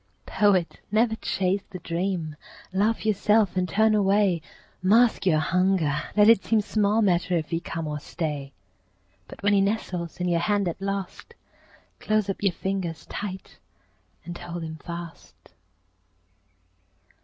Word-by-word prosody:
Poet, 195 -5 +2
never 220 +1 +2
chase 190 0 0
the 185 - -7
dream. 170 -2 -3 0.4
Laugh 215 +4 +1
yourself 210 -1 +2
and 180 -1 0
turn 220 +4 +3
away. 200 -4 +3 0.4
Mask 220 +2 +4
your 160 -4 +4
hunger; 175 -1 +1 0.2
let 210 0 +7
it 230 -3 +6
seem 225 - +2
Small 215 +1 +1
matter 180 -2 +2
if 160 0 -4
he 165 - 0
come 165 -1 -5
or 150 -1 -3
stay; 145 -3 -4 0.8
But - - -12
when 205 0 +3
he 200 - +4
nestles 185 -5 -2
in 180 - -1
your 170 -1 +2
hand 200 +2 +1
at 170 +2 -4
last, 195 -1 -5 0.6
Close 215 -2 0
up - - -8
your 200 -2 +3
fingers 185 -4 -3
tight 190 - -6 0.7
and 175 +1 -6
hold 175 -1 -6
him 160 0 -6
fast. 170 - -9
190 Hz, 145 wpm, -25 LUFS, 170-205 Hz, 0.8 s, let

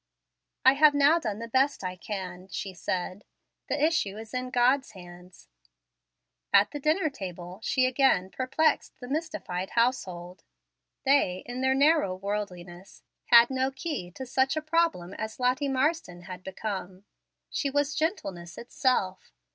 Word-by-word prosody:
"I 265 - +8
have 295 +1 +5
now 285 +4 +5
done 215 -10 -3
the 230 +1 -6
best 265 0 +1
I 185 0 -3
can," 185 -1 -6
she 195 0 -5
said. 185 +3 -4 0.5
"The 285 - 0
issue 300 -10 +1
is 220 0 -10
in 255 0 -3
God's 255 +1 +2
hands." 180 -1 -14 1.0
At - - +5
the 290 - -5
dinner 310 +4 +2
table 180 -5 -8
she 255 +3 +2
again 255 -8 +2
perplexed 265 +5 0
the 245 - -8
mystified 250 - -3
household. 185 -7 -1 0.6
They, 265 -10 +2
in 245 +1 -5
their 265 0 +2
narrow 285 - +3
worldliness, 185 -2 -6 0.2
had 235 +1 +7
no 260 0 +1
key 270 - -5
to 265 - -6
such 265 +3 +1
a - - 0
problem 310 - 0
as 220 +3 -6
Lottie 255 +3 +1
Marsden 270 - -1
had 180 0 -8
become. 190 -1 -5 0.5
She 280 - -1
was 290 +1 0
gentleness 195 - -3
itself. 235 -6 -1
240 Hz, 145 wpm, -28 LUFS, 185-280 Hz, 1.0 s, I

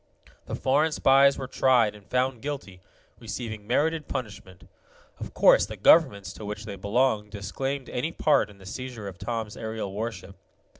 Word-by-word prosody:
The - - -3
foreign 145 +4 +2
spies 140 -1 +5
were 130 - -4
tried 125 -4 +3
and 105 -1 -15
found 125 -2 0
guilty, 135 -11 -6 0.4
receiving 110 -2 -6
merited 155 +5 0
punishment. 105 -8 -7 0.5
Of - - -8
course - - +5
the - - -8
governments 100 - +4
to - - -10
which 105 +1 -6
they 100 -2 -6
belonged 105 +2 0
disclaimed 135 +7 -4
any 140 +7 -2
part 150 -10 +2
in 100 - -15
the 95 - -15
seizure 120 0 -6
of 90 -3 -9
Tom's 110 -2 -4
aerial 110 -3 -5
warship. 100 -3 -6
115 Hz, 160 wpm, -26 LUFS, 105-135 Hz, 0.5 s, spies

